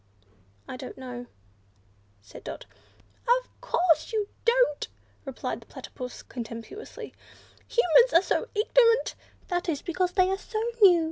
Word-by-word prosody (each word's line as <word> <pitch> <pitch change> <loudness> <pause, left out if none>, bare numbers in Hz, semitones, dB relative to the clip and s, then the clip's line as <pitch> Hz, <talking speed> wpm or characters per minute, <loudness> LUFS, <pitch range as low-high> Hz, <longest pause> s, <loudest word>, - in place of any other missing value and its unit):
"I 255 - -6
don't 255 -1 -8
know," 245 -2 -7 1.0
said 100 - -12
Dot. - - -6 0.6
"Of - - +1
course 360 -9 +2
you 425 -2 -1 0.2
don't!" 470 -10 +3 0.4
replied 270 -2 -4
the - - -17
Platypus, 250 -1 -8
contemptuously, 230 - -8 0.5
"Humans 475 +2 +5
are 335 +3 +6
so - - 0
ignorant! 460 +2 +4 0.3
That's 350 -5 -1
because 360 +1 0
they 370 -1 +3
are 385 - -1
so 435 +1 -4 0.2
new. 365 -4 +8
360 Hz, 125 wpm, -27 LUFS, -, 1.0 s, new